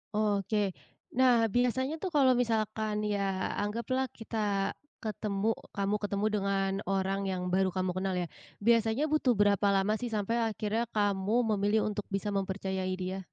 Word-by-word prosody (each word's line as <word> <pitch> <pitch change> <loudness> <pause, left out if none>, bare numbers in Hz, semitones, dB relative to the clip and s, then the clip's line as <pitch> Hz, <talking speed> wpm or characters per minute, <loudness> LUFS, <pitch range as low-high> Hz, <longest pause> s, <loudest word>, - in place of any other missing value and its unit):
Oke. 205 -1 +1 0.4
Nah 245 -2 +5
biasanya 255 +3 +2
tuh 380 - -1
kalau 265 -3 +6
misalkan 220 -2 -1
ya 195 -2 -1
anggaplah 235 +5 -1
kita 210 -3 -1 0.3
ketemu 215 -1 -1 0.2
kamu 200 +1 +1
ketemu 205 0 -1
dengan 195 -1 0 0.2
orang 195 0 0
yang 185 -1 -2
baru 190 0 +3
kamu 185 0 -1
kenal 190 0 -1
ya, 175 -1 -1 0.3
biasanya 230 +4 +3
butuh 290 -5 +3
berapa 205 0 +3
lama 195 +2 +2
sih 245 - -2
sampai 215 +1 0
akhirnya 215 +2 -1
kamu 205 -1 0 0.2
memilih 205 +2 +2
untuk 210 -1 -3
bisa 200 +1 -1
mempercayai 190 -1 -2
dia? 185 +1 -3
205 Hz, 145 wpm, -30 LUFS, 195-225 Hz, 0.4 s, kalau